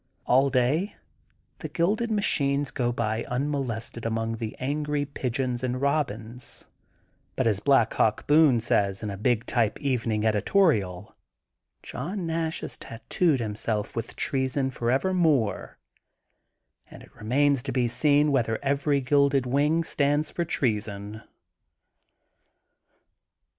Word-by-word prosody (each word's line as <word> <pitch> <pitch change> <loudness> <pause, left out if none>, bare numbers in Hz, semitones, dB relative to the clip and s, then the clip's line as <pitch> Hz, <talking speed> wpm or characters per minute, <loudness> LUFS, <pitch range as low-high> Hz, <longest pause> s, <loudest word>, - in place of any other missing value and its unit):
All 135 +2 +4
day 135 - +1 0.6
the - - -6
gilded 210 +7 0
machines 145 -9 +1
go 120 -3 -1
by 115 -1 -2
unmolested 125 -4 -3
among 115 0 -2
the 110 -1 -5
angry 145 +2 -1
Pigeons 125 -2 -3
and 125 -1 -1
Eobins, 125 -4 -3 0.7
but - - 0
as 105 -4 +2
Black 115 -1 +3
Hawk 110 - +1
Boone 150 -5 +5
says 100 -3 0
in 105 - -3
a - - -5
big 120 +2 +1
type 115 -4 0
evening 115 -6 -1
edi 110 -1 +2
torial: 105 - +1 0.7
John 175 - -5
Nash 160 -1 -2
has - - -4
tattooed 140 +6 -1
himself 105 -1 -3
with 115 -1 -5
treason 130 0 -1
f 130 - -13
orevermore 135 - +1 1.1
and - - -12
it - - -19
remains 140 +4 +1
to 135 +1 -4
be 125 -2 +1
seen 145 +5 +3
whether 115 -5 +1
every 140 0 +1
gilded 140 0 +2
wing 145 +6 +2
stands 145 0 0
for 170 - -2
treason.' 105 -7 -2
130 Hz, 125 wpm, -26 LUFS, 115-145 Hz, 1.1 s, Boone